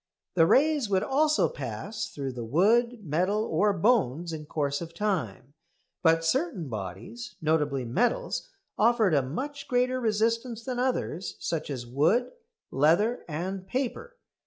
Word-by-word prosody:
The 165 -2 +5
rays 280 - +3
would 190 -2 +2
also 305 +3 +3
pass 215 - -5
through 135 -2 -5
the 120 -2 -6
wood, 220 - +2
metal, 185 +8 +1
or 205 +5 +2
bones 175 - +1
in 150 -1 -7
course 145 -2 -1
of 165 0 -8
time; 155 - -2 0.5
but 165 -1 +3
certain 165 -1 0
bodies, 110 +3 -7
notably 150 -4 0
metals, 245 - 0 0.3
offered 220 -4 +4
a 140 - +4
much 270 - -5
greater 250 +1 +1
resistance 230 +1 0
than 255 -2 -3
others, 250 -7 -1
such 160 -2 -3
as 130 -4 -4
wood, 155 - +2 0.4
leather, 170 - +3
and 185 +4 -4
paper. 275 - -3
185 Hz, 135 wpm, -28 LUFS, 150-240 Hz, 0.5 s, The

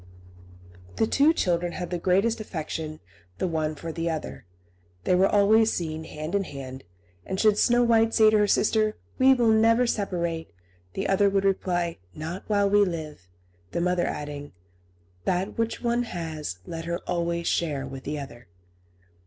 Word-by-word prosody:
The - - +2
two 285 +7 +4
children 175 - 0
had 180 -1 -5
the 175 - -2
greatest 195 +7 +2
affection 160 -5 -5 0.4
the - - -1
one 155 -2 -1
for 165 +2 -6
the 165 +1 -2
other. 155 - -5 0.6
They - - +2
were 185 +2 +5
always 215 +2 +4
seen 160 -2 -3
hand 155 +2 -6
in 200 -1 +2
hand; 135 -5 -8 0.4
and 190 - -4
should 215 -2 +4
Snow 240 +3 +3
White 225 -1 +4
say 215 -1 +6
to 215 - +4
her 210 - +3
sister, 215 +1 +2 0.2
"We 265 0 +6
will 235 -3 +3
never 230 +2 +4
separate," 170 - -2 0.4
the - - -2
other 200 +1 +3
would 195 0 +1
reply, 175 - 0 0.2
"Not 165 +5 -5
while 205 -1 +2
we 205 +1 +5
live," 155 - -5 0.4
the - - 0
mother 180 0 +1
adding, 145 -1 -6 0.7
"That 190 +5 -1
which 230 +1 -1
one 240 0 +1
has, 160 - -5
let 165 0 -6
her 170 +1 -2
always 170 -1 -1
share 145 -5 0
with 135 0 -8
the 150 +1 -3
other." 125 -4 -9
180 Hz, 165 wpm, -26 LUFS, 160-215 Hz, 0.7 s, say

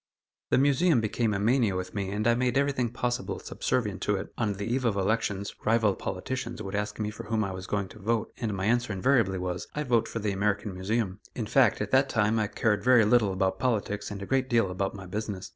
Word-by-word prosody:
The - - +3
Museum 145 +2 +4
became 110 +1 0
a 100 - 0
mania 110 -1 +2
with 90 0 -4
me 100 -2 -2
and 105 +2 -2
I 120 - +5
made 125 +1 +1
everything 140 -4 +1
possible 120 +1 -2
subservient 105 -6 -2
to 105 - +1
it. 95 +1 -6
On 110 -3 0
the 100 +1 -5
eve 125 +4 -1
of 115 -4 +1
elections, 100 0 -1
rival 110 -2 +3
politicians 120 +6 -4
would 100 -2 -6
ask 105 0 -2
me 105 -1 -1
for 105 - -9
whom 110 -1 0
I 100 - -3
was 95 0 -7
going 100 -2 -1
to - - -13
vote, 110 +2 -1
and 110 -5 -2
my 95 0 -2
answer 120 +1 +1
invariably 100 -2 +2
was, 90 -1 -4
"I 150 - -1
vote 120 -4 +2
for - - -5
the 105 -2 -1
American 100 +1 -1
Museum." 95 +1 -2 0.2
In 115 - -2
fact, 115 -1 +3
at 105 0 -3
that 135 +1 +4
time, 110 0 +2
I 105 - +1
cared 105 -2 0
very 125 -3 +6
little 110 -2 +4
about 95 +1 0
politics, 105 -4 -1
and 100 -1 -6
a - - -5
great 130 +3 0
deal 115 -6 +2
about 95 +3 -2
my 95 -1 -8
business. 100 0 -5
105 Hz, 235 wpm, -28 LUFS, 100-120 Hz, 0.2 s, very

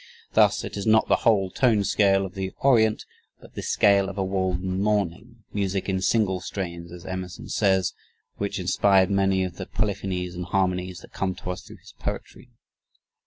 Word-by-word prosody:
Thus - - +4
it - - -6
is 100 - -3
not 110 0 +4
the - - +5
whole 100 -5 +2
tone 110 -3 +3
scale 100 -1 +3
of 95 - -8
the 95 -1 -4
Orient 110 -5 +3 0.3
but - - -16
the - - -5
scale 100 -1 +3
of 100 - -8
a 95 - +1
Walden 95 0 -1
morning 105 +3 -1
"music 100 -1 -1
in 95 -1 0
single 95 -1 +2
strains," 85 -2 -6
as 90 +1 -10
Emerson 95 -1 -6
says, 95 -3 +2 0.4
which - - -2
inspired 95 -1 +3
many 95 -1 +2
of 90 -2 -5
the - - -6
polyphonies 95 -3 -2
and 90 0 -5
harmonies 90 -2 -1
that - - -16
come 95 -1 -2
to 90 - -5
us 90 - -6
through - - -13
his - - -16
poetry. 125 - -6
95 Hz, 180 wpm, -25 LUFS, 90-100 Hz, 0.4 s, the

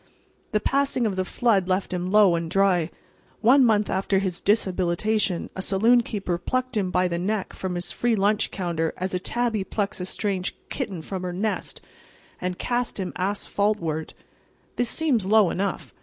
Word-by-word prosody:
The 210 - +2
passing 270 0 +1
of 205 -3 0
the 185 - 0
flood 200 -2 +1
left 185 0 0
him 180 +1 -2
low 205 -3 +6
and 165 -1 -2
dry. 185 -3 +2 0.5
One 255 +5 +6
month 215 -3 +3
after 195 +1 0
his 190 -3 -2
dishabilitation 190 -1 +1
a 190 - -3
saloon 225 +6 +4
keeper 195 -6 -3
plucked 255 +4 -2
him 195 -4 0
by 180 0 +2
the 170 -1 -2
neck 200 +2 -2
from 185 -1 -4
his 175 0 -2
free 240 -1 +1
lunch 205 +1 +1
counter 170 -3 -2
as 185 +1 -3
a 180 - 0
tabby 230 +1 -1
plucks 200 -1 -3
a 180 - -3
strange 195 -2 -2
kitten 180 -5 -4
from 190 +2 -5
her 180 -1 -4
nest, 210 +4 -2 0.6
and 180 0 -3
cast 245 -3 -1
him 185 -2 -3
asphaltward. 195 -4 -1 0.6
This 245 -2 +1
seems 260 -12 +1
low 210 -3 +5
enough. 195 +1 -3
195 Hz, 170 wpm, -25 LUFS, 180-220 Hz, 0.6 s, low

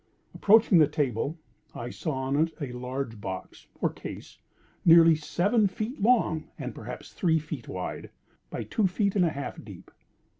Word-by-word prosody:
Approaching 210 -3 +5
the 155 - +6
table, 145 0 -1 0.4
I 120 +1 -5
saw 155 - -3
on 130 +1 -1
it 160 +2 +2
a 140 -5 -4
large 125 -2 -5
box, 95 -2 -7
or - - +2
case, - - -9 0.4
nearly 165 -1 +8
seven 200 +8 +1
feet 215 +6 -5
long, 210 -8 +2
and 125 -5 -5
perhaps 120 +4 -9
three 165 -3 +2
feet 150 -5 -6
wide, 90 -1 -5 0.4
by - - -4
two 210 -4 +1
feet 200 +2 0
and 190 - +4
a - - +2
half 140 -3 -6
deep. - - -12
155 Hz, 160 wpm, -27 LUFS, 130-185 Hz, 0.4 s, nearly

